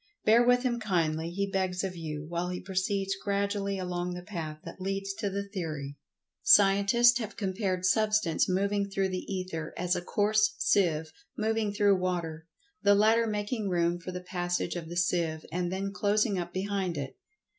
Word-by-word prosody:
Bear 225 Hz, +3 st, +6 dB
with 245 Hz, +1 st, +4 dB
him 240 Hz, -2 st, 0 dB
kindly, 165 Hz, -6 st, 0 dB
he 200 Hz, +3 st, -1 dB
begs 190 Hz, -2 st, -1 dB
of 190 Hz, -2 st, -3 dB
you, 155 Hz, -3 st, -5 dB
while 175 Hz, +1 st, -2 dB
he 180 Hz, 0 st, -3 dB
proceeds 195 Hz, +1 st, -1 dB
gradually 200 Hz, 0 st, -1 dB
along 180 Hz, -1 st, -3 dB
the 180 Hz, -, -7 dB
path 165 Hz, -6 st, -5 dB
that -, -, -10 dB
leads 195 Hz, +1 st, -2 dB
to 200 Hz, +1 st, -3 dB
the 200 Hz, +1 st, -4 dB
theory. 155 Hz, -8 st, -5 dB, 0.5 s
Scientists 235 Hz, -, +5 dB
have 220 Hz, -2 st, -6 dB
compared 190 Hz, -2 st, -1 dB
Substance 210 Hz, -4 st, +2 dB
moving 200 Hz, +2 st, 0 dB
through 195 Hz, -1 st, 0 dB
the 185 Hz, +1 st, -5 dB
Ether 185 Hz, -4 st, -4 dB
as 180 Hz, 0 st, 0 dB
a 175 Hz, -, -2 dB
coarse 210 Hz, +3 st, +2 dB
seive 160 Hz, -5 st, +2 dB, 0.3 s
moving 220 Hz, -1 st, 0 dB
through 205 Hz, -1 st, +3 dB
water, 170 Hz, -3 st, -3 dB, 0.3 s
the 205 Hz, 0 st, +5 dB
latter 225 Hz, +3 st, +4 dB
making 210 Hz, 0 st, -2 dB
room 175 Hz, -1 st, +1 dB
for 180 Hz, +2 st, -7 dB
the 180 Hz, 0 st, -6 dB
passage 175 Hz, -1 st, -2 dB
of 165 Hz, -2 st, -5 dB
the 175 Hz, -, -5 dB
seive, 170 Hz, -3 st, 0 dB
and 175 Hz, +1 st, -1 dB
then 195 Hz, +1 st, -3 dB
closing 205 Hz, -1 st, +1 dB
up 175 Hz, 0 st, -4 dB
behind 190 Hz, -2 st, -2 dB
it. 135 Hz, -2 st, -5 dB
190 Hz, 175 wpm, -29 LUFS, 175-205 Hz, 0.5 s, Bear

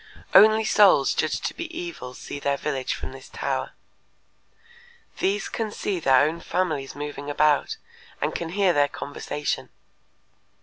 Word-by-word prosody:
Only 215 Hz, +2 st, +7 dB
souls 195 Hz, -11 st, +5 dB
judged 155 Hz, -, -1 dB
to -, -, -1 dB
be 340 Hz, -1 st, -6 dB
evil 340 Hz, -, -7 dB
see 145 Hz, -, -7 dB
their 140 Hz, 0 st, 0 dB
village 135 Hz, -3 st, -2 dB
from -, -, -7 dB
this 135 Hz, 0 st, -12 dB
tower. -, -, -3 dB, 1.5 s
These 195 Hz, +1 st, 0 dB
can 225 Hz, -2 st, -3 dB
see 200 Hz, -2 st, -3 dB
their 135 Hz, -3 st, +5 dB
own 165 Hz, +2 st, -4 dB
families 160 Hz, -8 st, -2 dB
moving 145 Hz, 0 st, -6 dB
about, 150 Hz, 0 st, +2 dB, 0.4 s
and -, -, -1 dB
can 170 Hz, -, -4 dB
hear 190 Hz, 0 st, +2 dB
their 145 Hz, -2 st, +3 dB
conversation. 145 Hz, +1 st, -4 dB
155 Hz, 140 wpm, -25 LUFS, 140-195 Hz, 1.5 s, Only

